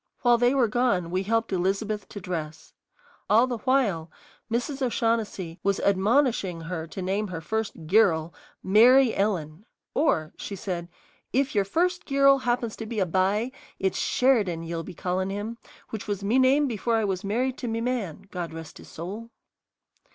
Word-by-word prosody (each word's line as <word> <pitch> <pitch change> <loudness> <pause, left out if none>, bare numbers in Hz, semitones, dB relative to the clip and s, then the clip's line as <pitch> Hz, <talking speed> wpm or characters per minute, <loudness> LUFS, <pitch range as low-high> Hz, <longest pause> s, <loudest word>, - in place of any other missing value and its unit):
While 240 -1 +5
they 245 +3 +3
were 255 -4 +4
gone 215 -7 +1
we 185 +1 0
helped 225 +1 0
Elizabeth 195 +3 -1
to 205 - -7
dress. 160 -4 -6 0.6
All 225 +4 +6
the 245 -3 -4
while 215 -11 +1 0.4
Mrs. 255 +4 -2
O'Shaughnessy 225 -8 -1
was 200 0 +1
admonishing 200 - +2
her 165 -1 -5
to 185 +3 -6
name 200 +3 -1
her 180 -3 -5
first 215 -1 -3
"girul" 170 -3 +3 0.3
Mary 240 +5 +6
Ellen; 180 -4 -1 0.3
"or," 160 - +1
she 200 - -6
said, 175 -3 -4 0.4
"if 270 +1 +1
yer 205 - +3
first 350 - 0
girul 275 -1 +5
happens 240 -2 -1
to 225 - -6
be 220 -1 -3
a 190 - +3
b'y, 195 +7 +1 0.3
it's 190 - -1
Sheridan 210 -11 +2
ye'll 165 0 -4
be 175 +2 -9
callin' 185 +2 -1
him, 210 +4 -5 0.3
which 220 -1 -5
was 200 -1 -3
me 225 +6 +3
name 270 +3 +4
before 230 -1 -1
I 220 -1 +1
was 190 -2 -2
married 245 +6 -1
to 245 - -4
me 225 0 -1
man, 230 -8 -3
God 175 -3 -4
rest 160 -2 -9
his - - -13
soul." 200 +8 -7
205 Hz, 170 wpm, -26 LUFS, 180-240 Hz, 0.6 s, All